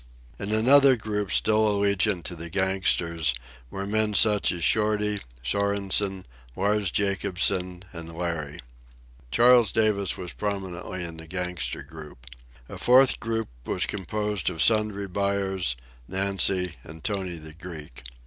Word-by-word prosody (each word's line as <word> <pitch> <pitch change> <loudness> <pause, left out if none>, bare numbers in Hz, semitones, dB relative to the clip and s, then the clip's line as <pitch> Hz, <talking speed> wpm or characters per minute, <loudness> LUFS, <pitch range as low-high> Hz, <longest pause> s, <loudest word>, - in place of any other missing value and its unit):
In 100 +1 -4
another 130 +5 +6
group, 105 -3 -3
still 110 0 +3
allegiant 100 -2 +1
to 90 +2 -5
the 85 0 -7
gangsters, 85 -5 +1 0.3
were 95 +7 -5
men 105 +1 0
such 105 -1 +4
as 85 -2 -4
Shorty, 105 0 +2 0.2
Sorensen, 100 +3 0 0.3
Lars 100 0 0
Jacobsen, 95 -1 0
and 85 -1 -8
Larry. 80 -3 -4 0.7
Charles 120 - +5
Davis 105 -4 +1
was 90 -5 -6
prominently 95 +2 -4
in 85 -1 -7
the 80 0 -10
gangster 90 -5 -3
group. 75 -4 -12 0.4
A - - -9
fourth 130 +1 +5
group 115 -1 -3 0.2
was - - +1
composed 105 0 -2
of 80 - -8
Sundry 105 -3 +2
Buyers, 95 -6 -1 0.3
Nancy, 95 -2 0
and 80 +1 -12
Tony 95 -4 -2
the 80 -1 -10
Greek. 80 -6 -10
95 Hz, 130 wpm, -25 LUFS, 85-105 Hz, 0.7 s, another